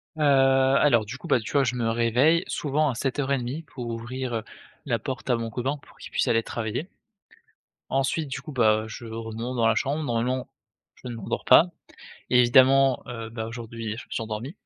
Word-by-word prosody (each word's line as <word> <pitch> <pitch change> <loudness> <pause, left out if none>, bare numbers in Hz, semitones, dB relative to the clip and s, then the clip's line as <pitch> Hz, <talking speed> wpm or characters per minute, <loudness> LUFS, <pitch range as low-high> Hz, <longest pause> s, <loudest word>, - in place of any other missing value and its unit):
Heu, 155 - -5
alors 135 -3 +4
du 125 +6 -7
coup, - - -10
bah, 125 - +3
tu 110 - -7
vois? 140 - +4
Je 125 -1 -1
me 115 -2 0
réveille 125 +9 +3
souvent 150 0 0
à 125 - -3
7:30 135 +2 -2
pour 125 -5 -8
ouvrir, 120 +2 -4
heu, 110 - -2 0.4
la 120 -6 0
porte 130 +4 -5
à - - +4
mon 115 -1 -3
copain 130 +5 -2
pour - - -20
qu'il - - -11
puisse - - 0
aller 115 -1 +2
travailler. 115 - -4 1.0
Ensuite 135 +3 0
du 130 - -4
coup, 155 - -9
bah, 110 -4 +3
je 115 +2 -8
remonte 115 +2 -5
dans 115 -1 +3
la - - +3
chambre 145 +3 -1
normalement, 125 +1 -1 0.5
je - - -11
ne 120 - -5
m'endors 110 - -4
pas. 140 +6 +8 0.7
Évidemment, 130 +2 +5
heu, 115 -2 -6
bah, 110 -1 -5
aujourd'hui, 115 -1 -6
je - - -8
me - - -32
suis - - -2
endormi 115 - -6
125 Hz, 195 wpm, -25 LUFS, 115-135 Hz, 1.0 s, pas